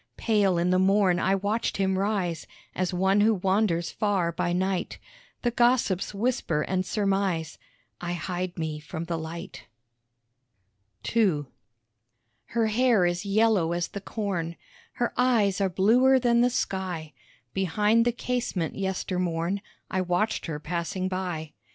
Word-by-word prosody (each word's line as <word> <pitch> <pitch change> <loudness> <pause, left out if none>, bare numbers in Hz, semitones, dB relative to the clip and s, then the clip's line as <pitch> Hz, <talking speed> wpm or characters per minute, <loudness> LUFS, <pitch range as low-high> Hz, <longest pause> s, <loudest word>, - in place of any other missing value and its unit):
Pale 205 -5 +2
in 175 +1 +1
the 185 - +3
morn 190 -1 +3
I 190 +1 +2
watch 205 +4 -1
him 190 -1 +1
rise, 190 -5 -1 0.3
As 185 -1 -1
one 190 +3 +2
who 220 +1 +4
wanders 190 -2 +1
far 195 -5 0
by 170 +1 -1
night. 185 +1 -1 0.5
The 240 - +2
gossips 240 -6 +2
whisper 205 -8 0
and 185 -1 -1
surmise 195 -4 -1 0.4
I 175 0 -3
hide 180 +1 -4
me 160 -2 -3
from 160 +2 -6
the 170 0 -3
light. 170 +3 -7 1.5
II 185 -11 +3 1.0
Her 230 -1 0
hair 220 -3 +3
is 175 +3 -1
yellow 200 -5 +3
as 175 0 -1
the 200 - -6
corn, 185 -6 -3 0.4
Her 240 - -1
eyes 220 -6 +3
are 195 - +2
bluer 240 +9 +4
than 235 -2 +3
the 245 - +4
sky; 185 - -3 0.4
Behind 210 +5 +2
the 240 - +2
casement 240 -8 -2
yester 190 -1 -2
morn, 175 +2 -1 0.3
I 185 - +1
watched 180 +5 0
her 150 -2 -4
passing 170 +4 -3
by. 180 -5 -4
190 Hz, 140 wpm, -27 LUFS, 175-215 Hz, 1.5 s, who